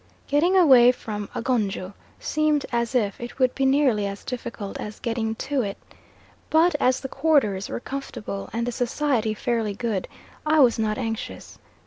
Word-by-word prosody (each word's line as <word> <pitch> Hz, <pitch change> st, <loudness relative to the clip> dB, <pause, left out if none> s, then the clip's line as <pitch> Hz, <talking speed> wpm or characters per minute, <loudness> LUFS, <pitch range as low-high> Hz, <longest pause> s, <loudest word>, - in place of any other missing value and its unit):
Getting 340 Hz, +7 st, +3 dB
away 260 Hz, -8 st, +7 dB
from 210 Hz, -5 st, -6 dB
Agonjo 205 Hz, -6 st, -1 dB, 0.3 s
seemed 305 Hz, -2 st, +1 dB
as 235 Hz, +1 st, -1 dB
if 210 Hz, -4 st, 0 dB
it 240 Hz, 0 st, -7 dB
would 255 Hz, -1 st, +2 dB
be 270 Hz, -1 st, +1 dB
nearly 265 Hz, -7 st, +3 dB
as 200 Hz, 0 st, -7 dB
difficult 235 Hz, -5 st, -6 dB
as 210 Hz, 0 st, -7 dB
getting 225 Hz, -1 st, -2 dB
to 275 Hz, +4 st, -1 dB
it, 200 Hz, -3 st, -4 dB, 0.7 s
but 330 Hz, +3 st, +4 dB
as 255 Hz, -1 st, +2 dB
the 265 Hz, -, -4 dB
quarters 270 Hz, -10 st, +1 dB
were -, -, -3 dB
comfortable 240 Hz, -7 st, -6 dB
and 230 Hz, +1 st, -2 dB
the 245 Hz, -, -2 dB
society 245 Hz, -2 st, 0 dB
fairly 220 Hz, -2 st, -1 dB
good, 220 Hz, -4 st, -2 dB, 0.4 s
I 310 Hz, 0 st, +3 dB
was 245 Hz, -4 st, +5 dB
not 215 Hz, -1 st, 0 dB
anxious. 225 Hz, -3 st, -5 dB
240 Hz, 160 wpm, -24 LUFS, 215-275 Hz, 0.7 s, away